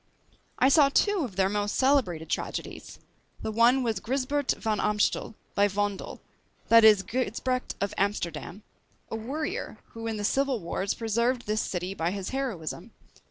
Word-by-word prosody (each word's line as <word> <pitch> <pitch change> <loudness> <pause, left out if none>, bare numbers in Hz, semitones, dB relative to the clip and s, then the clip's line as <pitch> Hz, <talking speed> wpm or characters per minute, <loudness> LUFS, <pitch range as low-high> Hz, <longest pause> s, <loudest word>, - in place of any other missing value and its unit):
I 255 - +4
saw 280 0 +6
two 410 +7 +2
of 245 - -3
their 190 0 +3
most 205 +1 -1
celebrated 245 - +2
tragedies. - - -4 0.5
The 220 - -2
one 240 +4 +4
was 225 -4 -1
Gysbert 270 +4 0
Van 220 -2 -1
Amstel, 210 +1 0 0.2
by 205 0 +4
Vondel; 205 0 -3 0.5
that 230 0 +8
is 210 -3 +7
Gysbrecht 255 +3 -2
of 200 - -2
Amsterdam, 195 -1 -2 0.5
a - - -2
warrior, 305 - -4
who 225 0 -7
in 220 -1 -2
the 205 - -4
civil 270 +1 +1
wars 190 +2 -2
preserved 235 +2 0
this 215 +1 0
city 180 +1 -3
by 165 -3 -1
his 195 0 -4
heroism. 245 - -4
220 Hz, 155 wpm, -27 LUFS, 200-260 Hz, 0.5 s, that